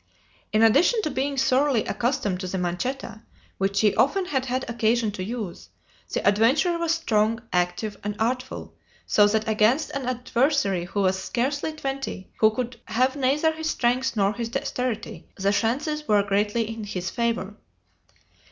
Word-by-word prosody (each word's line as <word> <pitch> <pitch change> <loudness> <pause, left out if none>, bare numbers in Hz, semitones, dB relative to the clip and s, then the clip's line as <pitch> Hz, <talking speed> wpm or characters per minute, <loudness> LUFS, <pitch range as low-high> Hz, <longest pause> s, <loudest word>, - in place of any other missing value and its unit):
In 215 +1 +3
addition 280 - +5
to 305 - -1
being 275 +2 -2
thoroughly 265 -2 +2
accustomed 235 -7 -1
to 185 - -4
the 190 - -3
manchetta, 200 +7 -3 0.4
which 195 +1 +1
he 210 -2 +4
often 365 +8 +2
had 265 -6 -1
had 255 +1 -2
occasion 230 -1 +1
to 190 -2 -5
use, 210 -3 -6 0.4
the - - -1
adventurer 265 - +3
was 335 -1 0
strong, 225 -9 +1
active, 180 +4 0
and 205 0 -3
artful, 250 +3 -2 0.3
so 205 -1 +5
that 220 +1 0
against 220 +7 +2
an 275 -2 -4
adversary 250 - +1
who 200 +3 -2
was 190 0 +2
scarcely 285 +5 -1
twenty, 270 -9 -5
who 215 - +6
could 235 +1 -4
have 255 +3 +1
neither 285 +4 +2
his 320 0 -3
strength 250 -1 +1
nor 200 0 +2
his 230 +1 -4
dexterity, 250 -3 -3
the 200 +1 +1
chances 290 +8 -1
were 205 -1 +4
greatly 205 +3 0
in 225 -1 -6
his 185 -4 -4
favor. 230 -4 -1
235 Hz, 160 wpm, -25 LUFS, 205-270 Hz, 0.4 s, who